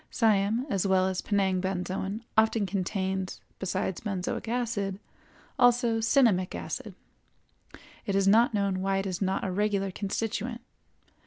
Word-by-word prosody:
Siam 220 +1 +2
as 200 -6 0
well 190 -1 +3
as 190 -1 -2
Penang 190 -3 +1
benzoin 190 +3 -3
often 220 -1 +3
contains, 190 0 -2 0.2
besides 190 -1 -2
benzoic 195 0 -3
acid, 220 -5 -2 0.6
also 245 -2 +4
cinnamic 225 -6 +3
acid; - - -6 1.1
it 200 - 0
is 195 0 +3
not 225 +4 +5
known 200 -3 0
why 195 0 +1
it 195 - -1
is 185 -1 -3
not 190 0 0
a 190 - -1
regular 200 0 0
constituent. 225 +4 -3
195 Hz, 135 wpm, -28 LUFS, 190-225 Hz, 1.1 s, not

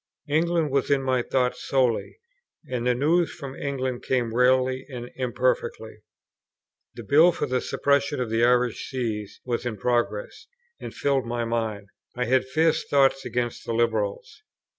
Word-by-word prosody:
England 165 0 +1
was 135 -1 +1
in 140 -1 +2
my 130 -1 +1
thoughts 125 0 -1
solely, 125 -4 0 0.5
and 125 -2 -2
the 125 - +3
news 160 +6 +2
from 140 -4 -8
England 130 -3 -3
came 120 -3 -1
rarely 130 +1 +3
and 120 -2 -7
imperfectly. 470 - -1 1.0
The - - -8
Bill 160 +5 +5
for 150 - -2
the 130 -2 -1
Suppression 140 0 +1
of 120 -3 -2
the 115 +1 +2
Irish 125 -1 +2
Sees 110 -6 -4
was 120 -2 -2
in 120 -3 -4
progress, 115 -2 -1 0.3
and - - -7
filled 135 -3 0
my 120 0 -2
mind. 110 -3 -3 0.3
I 125 0 -1
had 130 +2 +2
fierce 160 +4 +2
thoughts 135 -1 +2
against 120 -1 -2
the 115 - -3
Liberals. 110 -3 -1
125 Hz, 155 wpm, -25 LUFS, 120-140 Hz, 1.0 s, Bill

